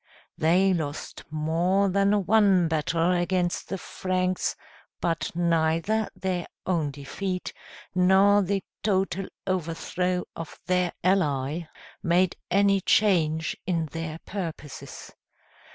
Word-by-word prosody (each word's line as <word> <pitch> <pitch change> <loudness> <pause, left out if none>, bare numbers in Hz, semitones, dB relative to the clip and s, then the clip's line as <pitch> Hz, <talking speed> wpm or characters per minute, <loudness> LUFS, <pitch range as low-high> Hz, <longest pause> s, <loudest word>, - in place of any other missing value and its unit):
They 185 +4 +3
lost 155 -4 -4
more 165 +6 +1
than 200 +1 +2
one 195 -4 +4
battle 165 +2 +1
against 175 0 0
the 195 - -2
Franks, 185 0 -1 0.4
but 165 -1 -1
neither 170 +5 +1
their 185 -2 -2 0.2
own 165 -5 +1
defeat, 180 +7 -4 0.4
nor 190 +3 +5
the 195 0 -1 0.2
total 195 -2 0 0.2
overthrow 180 0 -1
of 165 -2 -8
their 180 -1 +1
ally, 160 -4 +1 0.3
made 180 0 +2
any 200 +1 +3
change 165 -6 +2
in 170 -3 +1
their 165 -1 -4
purposes. 165 -7 -7
180 Hz, 105 wpm, -26 LUFS, 165-190 Hz, 0.4 s, nor